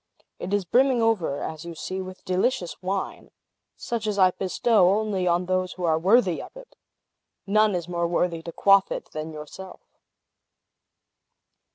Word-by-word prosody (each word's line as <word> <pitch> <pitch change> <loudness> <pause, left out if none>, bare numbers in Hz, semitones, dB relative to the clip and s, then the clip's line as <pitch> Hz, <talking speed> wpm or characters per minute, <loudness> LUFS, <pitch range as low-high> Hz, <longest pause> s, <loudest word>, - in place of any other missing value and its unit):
It 185 - -5
is 205 -2 0
brimming 255 +6 +3
over, 215 -11 0
as 160 0 -6
you 170 -1 -8
see, 185 +4 -4
with 185 0 -10
delicious 185 0 -1
wine, 190 +1 -4 0.5
such 230 -2 -3
as 210 -1 -1
I 185 -2 +5
bestow 185 +2 +2
only 205 -4 -1
on 175 +1 +2
those 185 0 -1
who 180 - -8
are 160 -2 +2
worthy 190 -1 +3
of - - -12
it! - - -14 0.7
None 215 0 +3
is 175 -2 -3
more 170 -1 -1
worthy 170 -1 0
to 170 - -7
quaff 195 +2 +4
it - - -5
than 155 +1 -5
yourself!" 155 +5 -10
185 Hz, 160 wpm, -25 LUFS, 170-205 Hz, 0.7 s, I